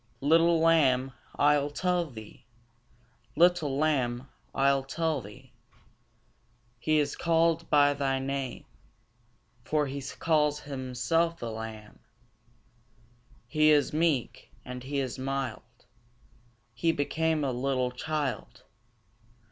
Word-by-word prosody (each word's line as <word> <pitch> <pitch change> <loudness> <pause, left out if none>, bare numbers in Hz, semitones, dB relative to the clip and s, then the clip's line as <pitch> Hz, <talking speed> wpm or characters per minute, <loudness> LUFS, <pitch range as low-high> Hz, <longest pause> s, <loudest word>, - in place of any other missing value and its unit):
Little 165 +3 +4
lamb, 135 -6 +3 0.2
I'll 145 0 +3
tell 175 +2 -1
thee; 110 -4 -12 0.9
Little 165 -4 +3
lamb, 130 -4 0 0.3
I'll 135 0 +3
tell 155 +1 -1
thee: 105 -1 -14 1.3
He 155 +5 +1
is 145 -1 0
callèd 165 0 +1
by 145 -1 +5
thy 135 -1 -1
name, 135 -1 -4 1.0
For 150 +4 0
He 140 0 -5 0.2
calls 150 -2 +1
Himself 145 +5 -1
a 115 -1 -4
Lamb. 110 -1 -8 1.5
He 155 +3 +3
is 150 -1 +3
meek, 155 -5 0 0.2
and 125 0 -7
He 140 +3 -4
is 130 -1 -3
mild, 130 -3 -5 0.9
He 165 - +1
became 160 +1 0
a 135 - 0
little 125 0 -1
child. 140 -2 -4
145 Hz, 105 wpm, -28 LUFS, 130-160 Hz, 1.5 s, by